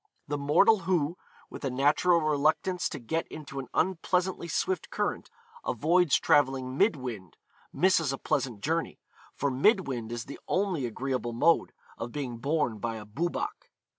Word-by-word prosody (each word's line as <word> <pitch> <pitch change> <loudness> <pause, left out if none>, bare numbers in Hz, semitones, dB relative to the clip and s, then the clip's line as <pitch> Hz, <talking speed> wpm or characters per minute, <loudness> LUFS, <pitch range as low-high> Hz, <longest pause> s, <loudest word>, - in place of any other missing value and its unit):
The 145 - -1
mortal 175 +10 +5
who, 170 -3 0 0.4
with - - -9
a 135 - 0
natural 150 +7 +3
reluctance 155 +4 +1
to 150 - -5
get 160 +6 -2
into 145 -3 -7
an 130 - -6
unpleasantly 180 0 0
swift 370 - -1
current, - - -2 0.3
avoids 170 0 +3
travelling 135 -3 +2
mid 195 +5 +3
wind, 115 - -7 0.3
misses 170 -6 +3
a 135 - -3
pleasant 120 -6 -2
journey, 165 +5 -1 0.4
for 140 0 0
mid 190 - +3
wind 120 -4 -4
is 120 -1 -4
the 140 - -9
only 180 -9 0
agreeable 125 0 -3
mode 160 +8 +3 0.3
of 115 +1 -4
being 130 -4 -4
borne 140 -5 0
by 115 +1 -3
a 110 -1 -8
Boobach. 160 +12 -3
145 Hz, 155 wpm, -29 LUFS, 130-170 Hz, 0.4 s, mortal